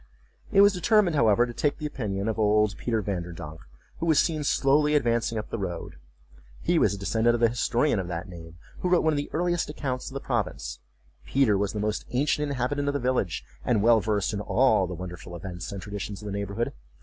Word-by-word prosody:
It 200 -2 +6
was 200 0 +6
determined, 185 -2 +3
however, 115 -3 +4
to 120 - -7
take 145 +4 0
the 155 - -6
opinion 105 -8 -3
of 110 0 -1
old 105 -1 +3
Peter 115 -3 -1
Vanderdonk, 85 -4 -5 0.4
who 170 - -2
was 160 -3 +4
seen 155 -1 +2
slowly 150 +2 +3
advancing 115 -4 +1
up 105 - -5
the - - -3
road. 90 -4 -5 0.6
He - - +2
was 100 - +3
a - - -7
descendant 110 +4 +2
of - - -2
the 115 -1 +4
historian 120 +1 +1
of 90 - -4
that 85 -1 -4
name, 85 -2 -11 0.2
who 180 - -1
wrote 180 -1 +4
one 160 -1 +3
of - - -1
the 145 - -3
earliest 175 0 0
accounts 130 -4 -4
of 135 - -12
the - - -2
province. 120 -7 -3 0.5
Peter 130 -7 +3
was 100 0 0
the 105 - -3
most 105 +1 -2
ancient 145 +3 0
inhabitant 140 +2 -1
of 145 - 0
the - - +1
village, 125 - -1 0.2
and 105 - +1
well 115 -1 +5
versed 105 -1 0
in 105 - -2
all 110 -4 +3
the 90 - -5
wonderful 90 -1 -8
events 90 +1 -6
and 100 -2 -6
traditions 100 -1 -5
of 105 - -11
the 105 - -4
neighborhood. 100 +3 -2
115 Hz, 220 wpm, -26 LUFS, 100-140 Hz, 0.6 s, It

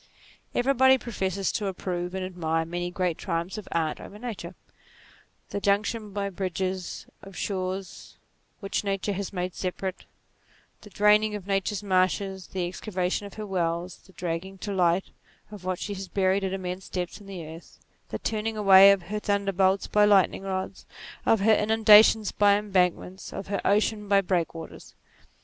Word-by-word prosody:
Everybody 265 +1 +4
professes 195 -6 -2
to 205 - -2
approve 180 -1 -4
and 190 -1 -2
admire 165 -3 -1
many 175 +1 -3
great 180 -2 -2
triumphs 170 +3 -3
of 210 - -11
Art 160 -2 -1
over 205 - -10
Nature: 230 -2 -7 0.9
the 200 - -4
junction 210 +2 0
by 200 0 -3
bridges 185 0 -3 0.2
of 195 -1 -12
shores 185 -1 -4 0.4
which 195 0 -2
Nature 200 0 -1
had 195 0 -4
made 180 -2 -3
separate, 185 +1 -4 0.8
the 210 - -13
draining 210 +1 +3
of 200 -3 -7
Nature's 195 0 -1
marshes, 190 0 0
the 185 -2 -3
excavation 185 +1 -3
of 200 - -13
her 215 - -5
wells, 175 -2 -2
the 190 - -21
dragging 180 +3 -4
to 200 +2 -5
light 180 0 +1 0.4
of 200 -4 -10
what 185 -1 -1
she 205 - -4
has 195 -1 -6
buried 190 +1 +1
at 190 - -1
immense 185 0 -5
depths 180 +2 -4
in 200 - -14
the 185 -4 -7
earth; 160 +2 -12 0.3
the - - -3
turning 220 0 -2
away 195 -1 +8
of 195 -2 +1
her 210 +4 -4
thunderbolts 195 -2 +1
by 210 - +3
lightning 200 -3 +4
rods, 190 -1 -5 0.4
of 225 - +4
her 220 +2 +5
inundations 215 0 +6
by 205 -1 +4
embankments, 190 -2 -1
of 195 - -7
her 200 - -1
ocean 210 +1 +1
by 200 0 +5
break 180 -4 -1
waters. 165 0 -10
195 Hz, 165 wpm, -26 LUFS, 180-205 Hz, 0.9 s, away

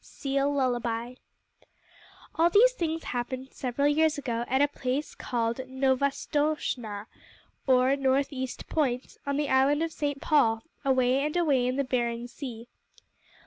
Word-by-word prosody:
Seal 275 0 -1
Lullaby 245 -3 -1 1.2
All 335 +1 +3
these 450 +7 +6
things 325 -8 -3
happened 255 +2 -4
several 265 +2 -1
years 310 +1 +3
ago 240 -4 -2
at 265 - +1
a 290 - +5
place 280 0 -3
called 230 -1 -2
Novastoshnah, 265 -4 -1 0.6
or 260 +1 +4
North 275 +1 +1
East 260 -1 -5
Point, 260 -5 -1
on 280 0 0
the 295 -1 -1
Island 275 +4 +3
of 330 -1 -3
St. 285 -1 -2
Paul, 255 -8 +2 0.2
away 260 0 +2
and 300 +3 -1
away 280 -8 +2
in 255 - 0
the 280 - +1
Bering 240 -2 -1
Sea. 240 -2 -8
265 Hz, 140 wpm, -28 LUFS, 245-290 Hz, 1.2 s, these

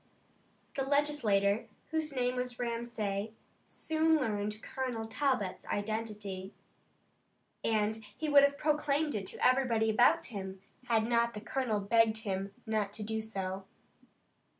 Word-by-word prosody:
The 275 - -2
legislator, 260 -8 +2 0.2
whose 315 -1 -1
name 250 -2 0
was 250 -1 -3
Ramsay, 225 -3 -2 0.3
soon 320 0 +2
learned 210 -6 -1
Colonel 250 -4 -3
Talbot's 225 -5 -1
identity, 205 -3 -3 1.1
and 220 0 +1
he 315 - -2
would 290 -1 +8
have 280 0 +3
proclaimed 300 0 +1
it 195 -3 -3
to - - -2
everybody 240 -4 +3
about 240 +3 +4
him, 190 -3 -6 0.3
had 225 -2 +3
not 235 0 +2
the - - -4
colonel 235 -2 -1
begged 225 +2 +3
him 195 -1 -2
not 215 -3 -1
to 215 - -4
do 220 +1 -2
so. 195 -3 -4
225 Hz, 125 wpm, -32 LUFS, 205-260 Hz, 1.1 s, would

